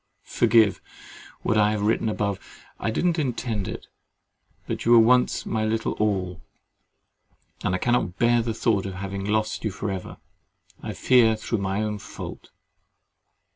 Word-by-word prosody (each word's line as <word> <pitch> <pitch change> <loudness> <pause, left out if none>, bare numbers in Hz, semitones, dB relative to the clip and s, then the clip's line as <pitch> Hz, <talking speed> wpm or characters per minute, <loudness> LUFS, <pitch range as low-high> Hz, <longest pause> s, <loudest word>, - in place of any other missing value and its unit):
—Forgive 110 -4 +3 0.6
what 110 - +2
I 105 0 +4
have 105 -1 -2
written 110 +1 +1
above; 100 -2 -1 0.4
I 105 - -1
did 110 - -1
not 170 -2 +2
intend 115 -7 -2
it: - - -6 0.8
but - - -4
you 120 - +4
were - - +9
once 125 +2 +4
my 110 -1 -1
little 110 +1 0
all, 95 -5 -1 1.2
and 90 - +1
I - - +1
cannot 120 -4 0
bear 120 0 +3
the 115 -1 -3
thought 100 -4 +1
of 95 - -6
having 95 +1 -5
lost 110 +1 -1
you 110 - 0
for 100 +1 -4
ever, 95 -1 -6 0.6
I - - -5
fear 120 -4 +4
through 110 +1 -3
my 100 +2 -1
own 105 -1 -3
fault. - - -9
110 Hz, 160 wpm, -25 LUFS, 100-115 Hz, 1.2 s, were